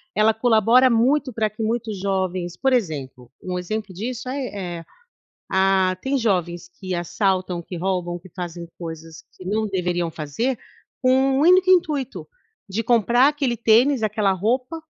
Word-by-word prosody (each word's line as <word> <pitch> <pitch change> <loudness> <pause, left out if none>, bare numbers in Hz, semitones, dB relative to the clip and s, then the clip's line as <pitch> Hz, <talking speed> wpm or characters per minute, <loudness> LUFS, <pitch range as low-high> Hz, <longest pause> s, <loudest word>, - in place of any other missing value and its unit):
ela 215 +1 +4
colabora 235 +2 +4
muito 255 +4 +2
pra 215 -1 0
que 215 +2 -9
muitos 220 -3 -2
jovens, 185 -2 -2
por 265 -1 +1
exemplo 135 - -3
um 180 -1 -3
exemplo 205 +1 -4
disso, 245 +6 -5
ai 270 0 -3
eh, 175 -6 -6 0.7
ah, 190 -1 +3
tem 275 +1 0
jovens 175 -7 -1
que 185 -1 -3
assaltam, 185 0 -1
que 175 +1 -8
roubam, 180 -1 -2
que 185 - -15
fazem 175 -2 -6
coisas 165 -1 -8
que 185 - -12
não 215 +3 0
deveriam 175 -3 -1
fazer, 160 - -2 0.4
com 255 -1 +3
um 265 +1 +2
único 365 +3 +5
intuito 305 -8 +1 0.4
de 205 +4 -1
comprar 240 +3 +4
aquele 280 -5 -1
tênis, 235 +4 +4
aquela 210 -2 +1
roupa, 250 - -1
210 Hz, 150 wpm, -22 LUFS, 180-250 Hz, 0.7 s, único